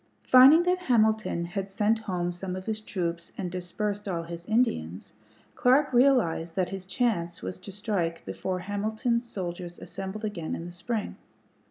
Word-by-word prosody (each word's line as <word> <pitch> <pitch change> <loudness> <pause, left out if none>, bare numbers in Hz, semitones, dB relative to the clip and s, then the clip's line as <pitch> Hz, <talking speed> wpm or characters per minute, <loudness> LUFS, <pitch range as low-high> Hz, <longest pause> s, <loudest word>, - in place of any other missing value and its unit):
Finding 270 +6 +8
that 360 +1 +2
Hamilton 220 - +2
had 195 +3 -4
sent 210 +3 +1
home 180 -5 -2
some 180 +1 -5
of 185 0 -6
his 215 -1 -2
troops 170 -5 -4
and 180 -3 -3
dispersed 200 +3 -3
all 170 -3 -2
his 170 +1 -8
Indians, 95 - 0 0.4
Clark 265 +3 +3
realized 240 -11 +3
that 185 -2 0
his 190 -1 -6
chance 185 -5 -1
was 185 - -5
to 190 +2 -9
strike 190 -5 -2
before 185 -1 -3
Hamilton's 220 +5 -1
soldiers 175 -3 -5
assembled 195 +3 -6
again 175 -7 -3
in 165 - -6
the 175 - -7
spring. 215 +5 -4
195 Hz, 160 wpm, -28 LUFS, 175-220 Hz, 0.4 s, Finding